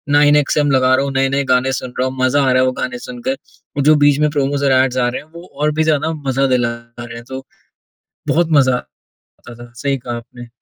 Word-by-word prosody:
9XM 145 Hz, 0 st, +3 dB
लगा 130 Hz, -1 st, +3 dB
रहा 135 Hz, -, 0 dB
हूँ, 140 Hz, -, -3 dB
नए-नए 135 Hz, +1 st, +1 dB
गाने 130 Hz, +1 st, +1 dB
सुन 130 Hz, -2 st, -5 dB
रहा 130 Hz, -, +1 dB
हूँ, 130 Hz, -, -6 dB
मज़ा 135 Hz, +3 st, +3 dB
आ 130 Hz, -, +2 dB
रहा 130 Hz, 0 st, +3 dB
है -, -, +3 dB
वो 130 Hz, -, +1 dB
गाने 125 Hz, -1 st, -3 dB
सुनकर। 250 Hz, +2 st, -5 dB, 0.4 s
वो 140 Hz, -, +1 dB
जो 155 Hz, +1 st, +5 dB
बीच 145 Hz, 0 st, +4 dB
में 150 Hz, -, +3 dB
प्रोमोज़ 140 Hz, -1 st, -1 dB
और 135 Hz, -, +3 dB
ऐड्स 130 Hz, -1 st, +2 dB
आ 120 Hz, -1 st, +2 dB
रहे 120 Hz, -, -5 dB
हैं, 150 Hz, -, -21 dB
वो 170 Hz, +1 st, -11 dB
और 150 Hz, +2 st, 0 dB
भी 160 Hz, -, +4 dB
ज़्यादा 155 Hz, 0 st, +1 dB, 0.2 s
मज़ा 135 Hz, +1 st, +1 dB
दिला 120 Hz, -1 st, +1 dB, 0.3 s
रहे 120 Hz, -1 st, -8 dB
हैं। 115 Hz, -, -9 dB
तो, 130 Hz, 0 st, -7 dB, 0.8 s
बहुत 170 Hz, 0 st, +2 dB
मज़ा 130 Hz, -2 st, +3 dB, 0.5 s
आता 120 Hz, -, -16 dB
था, 120 Hz, 0 st, -13 dB
सही 135 Hz, +3 st, -1 dB
कहा 120 Hz, -1 st, -6 dB
आपने। 120 Hz, +1 st, -11 dB
135 Hz, 235 wpm, -17 LUFS, 125-145 Hz, 0.8 s, जो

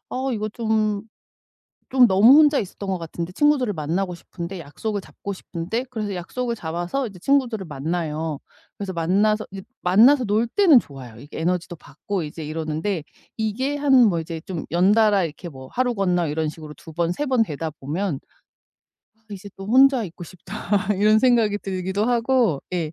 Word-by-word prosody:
'아 -, -, -4 dB, 0.2 s
이거 215 Hz, 0 st, -2 dB
좀 215 Hz, -2 st, 0 dB, 0.9 s
좀 255 Hz, -2 st, +6 dB
너무 215 Hz, +8 st, +7 dB
혼자 295 Hz, -2 st, +5 dB
있었던 200 Hz, 0 st, -5 dB
것 190 Hz, -, 0 dB
같은데. 170 Hz, +1 st, -6 dB
친구들을 280 Hz, -2 st, +2 dB
만나고 175 Hz, +4 st, -2 dB
싶은데. 170 Hz, +1 st, -8 dB
약속을 205 Hz, +8 st, -4 dB
잡고 200 Hz, -, -7 dB
싶은데.' 190 Hz, +7 st, -4 dB
그래서 215 Hz, -5 st, -4 dB
약속을 235 Hz, +7 st, -3 dB
잡아서 175 Hz, +9 st, -3 dB
이제 195 Hz, -5 st, -10 dB
친구들을 245 Hz, -6 st, +1 dB
만나요. 155 Hz, 0 st, -3 dB, 0.4 s
그래서 195 Hz, -2 st, -4 dB
만나서 205 Hz, +6 st, +1 dB
이제 195 Hz, -1 st, -7 dB, 0.2 s
만나서 235 Hz, +9 st, +5 dB
놀 215 Hz, +2 st, +1 dB
때는 325 Hz, -, +6 dB
좋아요. 130 Hz, -, -12 dB
이게 145 Hz, +3 st, -9 dB
에너지도 175 Hz, 0 st, -1 dB
받고 155 Hz, +7 st, -5 dB
이제 150 Hz, +1 st, -7 dB
이러는데 160 Hz, +3 st, -3 dB, 0.3 s
이게 255 Hz, +7 st, -1 dB
한 285 Hz, -1 st, +1 dB, 0.2 s
뭐 170 Hz, -4 st, 0 dB
이제 160 Hz, 0 st, -6 dB
좀 175 Hz, -4 st, -5 dB
연달아 200 Hz, +2 st, +4 dB
이렇게 165 Hz, +2 st, -7 dB
뭐 130 Hz, -2 st, -11 dB
하루 250 Hz, -1 st, +1 dB
건너 180 Hz, -5 st, +1 dB
이런 155 Hz, +1 st, -1 dB
식으로 155 Hz, -1 st, -10 dB
2 160 Hz, -, -12 dB
번 170 Hz, 0 st, 0 dB
2 295 Hz, +11 st, -3 dB
번 255 Hz, -4 st, +3 dB
되다 160 Hz, -5 st, -3 dB
보면 155 Hz, +2 st, -3 dB, 1.0 s
'아 220 Hz, -, -36 dB
이제 200 Hz, 0 st, -8 dB
또 195 Hz, -, -8 dB
혼자 260 Hz, +1 st, +5 dB
있고 175 Hz, -1 st, -10 dB
싶다.' 195 Hz, +3 st, -2 dB
이런 215 Hz, +2 st, +4 dB
생각이 230 Hz, -5 st, +3 dB
들기도 190 Hz, +1 st, -2 dB
하고, 235 Hz, -, +2 dB
예. 165 Hz, -3 st, -2 dB
195 Hz, 350 characters per minute, -23 LUFS, 165-225 Hz, 1.0 s, 너무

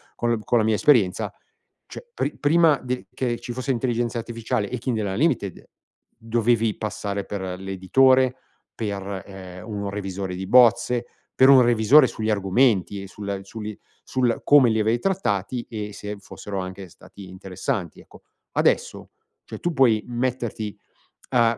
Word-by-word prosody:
con-con 120 Hz, 0 st, 0 dB
la 110 Hz, -, +2 dB
mia 110 Hz, 0 st, +2 dB
esperienza, 105 Hz, -7 st, +3 dB, 0.6 s
cioè 480 Hz, -, -10 dB
pri -, -, -3 dB
prima 155 Hz, 0 st, +4 dB
de 125 Hz, 0 st, -4 dB
che 120 Hz, -2 st, -2 dB
ci -, -, -7 dB
fosse 130 Hz, +3 st, -3 dB
intelligenza 120 Hz, -1 st, -1 dB
artificiale 115 Hz, -1 st, -3 dB
e 125 Hz, -, -3 dB
Kindle 115 Hz, -4 st, -2 dB
Unlimited, 100 Hz, -, -1 dB, 0.5 s
dovevi 115 Hz, -1 st, 0 dB
passare 100 Hz, -2 st, -4 dB
per 100 Hz, -2 st, -5 dB, 0.2 s
l'editore, 130 Hz, +8 st, +3 dB, 0.4 s
per, 100 Hz, -3 st, -4 dB
ehm, 95 Hz, 0 st, -10 dB
un 100 Hz, -2 st, -4 dB
revisore 95 Hz, -2 st, -4 dB
di 95 Hz, -, -5 dB
bozze, 120 Hz, +1 st, +4 dB, 0.3 s
per 130 Hz, +1 st, +5 dB
un 130 Hz, -2 st, +8 dB
revisore 120 Hz, +5 st, +6 dB
sugli 110 Hz, 0 st, -3 dB
argomenti 100 Hz, -1 st, +2 dB
e 100 Hz, -, -8 dB
sul 100 Hz, +1 st, -5 dB
su 100 Hz, +3 st, -10 dB
li 105 Hz, 0 st, -5 dB, 0.3 s
sul 125 Hz, -3 st, 0 dB
come 140 Hz, -5 st, +6 dB
li 110 Hz, -, +1 dB
avevi 110 Hz, +2 st, +1 dB
trattati 120 Hz, -, -1 dB
e 105 Hz, -2 st, -6 dB
se 105 Hz, 0 st, -6 dB
fossero 100 Hz, 0 st, -7 dB
anche 95 Hz, +1 st, -6 dB
stati 95 Hz, +3 st, -14 dB
interessanti, 95 Hz, -, -5 dB
ecco. -, -, -18 dB, 0.3 s
Adesso, -, -, 0 dB, 0.4 s
cioè -, -, -8 dB
tu 175 Hz, -, -2 dB
puoi 120 Hz, -7 st, +3 dB
metterti 120 Hz, -3 st, -3 dB, 0.5 s
a, 115 Hz, -3 st, +3 dB
110 Hz, 145 wpm, -23 LUFS, 100-125 Hz, 0.6 s, un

